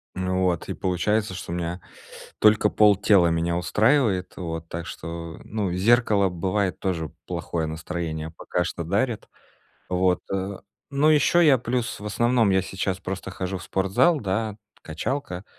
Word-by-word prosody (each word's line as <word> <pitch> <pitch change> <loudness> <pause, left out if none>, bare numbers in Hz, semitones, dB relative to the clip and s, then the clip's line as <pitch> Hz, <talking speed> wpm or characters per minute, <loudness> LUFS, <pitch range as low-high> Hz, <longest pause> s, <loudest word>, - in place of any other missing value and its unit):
Вот. 95 -1 0
И - - -1
получается, 100 +3 0
что 85 - -6
меня 90 +1 -3 0.6
только 105 0 +5
полтела 100 -3 +5
меня 85 +1 0
устраивает. 105 - +2
Вот. 80 -2 -5
Так 85 0 -5
что, 85 -1 -7
ну, 105 -4 -2
зеркало 105 0 +3
бывает 95 +2 -1
тоже 85 -5 -2 0.2
плохое 80 -2 -3
настроение 80 0 -4
пока 90 - -1
что 85 +1 -4
дарит. 105 +7 -1 0.6
Вот. 90 0 +2
Э, 95 0 -3 0.3
ну 140 +2 +3
ещё 155 +3 +4
я 150 -5 +6
плюс 120 0 -2
в 105 - -9
основном 120 0 +2
я 95 0 +3
сейчас 95 0 -3
просто 95 0 -5
хожу 95 0 -4
в - - -10
спортзал, 95 - +2
да, 105 +2 -1 0.3
качалка. 90 - -4
95 Hz, 140 wpm, -24 LUFS, 85-110 Hz, 0.6 s, я